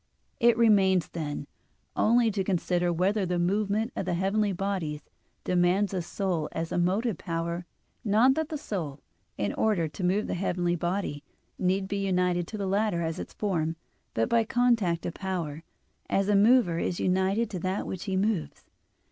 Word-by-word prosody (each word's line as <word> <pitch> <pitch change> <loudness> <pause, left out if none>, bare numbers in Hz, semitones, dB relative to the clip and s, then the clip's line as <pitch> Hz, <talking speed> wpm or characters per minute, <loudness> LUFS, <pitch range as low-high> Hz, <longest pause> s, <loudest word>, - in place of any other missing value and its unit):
It 235 -2 +5
remains, 195 -6 +4
then, 150 -3 -4 0.5
only 230 +1 +4
to 195 -1 -1
consider 180 -2 0
whether 190 +5 +1
the 180 -1 -1
movement 205 +5 0
of 190 - -3
the 180 - +1
heavenly 200 +3 +1
bodies 180 -6 -3 0.4
demands 180 +3 +2
a 185 - 0
soul 175 -3 -2
as 165 0 -3
the - - -1
motive 195 +4 0
power, 170 +1 -3 0.4
not 225 +4 +4
that 315 +1 -2
the 310 - -3
soul, 165 - -5 0.4
in 100 -1 -1
order 200 -7 +1
to 150 +5 -7
move 190 +4 +2
the - - -3
heavenly 175 -1 0
body, 175 -4 -2 0.4
need 190 +1 +1
be 200 +1 -2
united 180 -2 +1
to 215 - -6
the 200 - -2
latter 195 -3 +1
as 160 0 -3
its - - -7
form; 165 -6 -1 0.4
but 115 - +2
by 230 -1 +3
contact 225 -8 +1
of 170 - -3
power, 170 -6 -4 0.5
as 195 +1 +1
a 205 - +4
mover 200 -5 +4
is 175 - -2
united 190 +5 +1
to 185 - -3
that 185 +3 -2
which 190 -1 -5
he 190 -2 -1
moves. 200 -4 -1
190 Hz, 175 wpm, -28 LUFS, 175-210 Hz, 0.5 s, It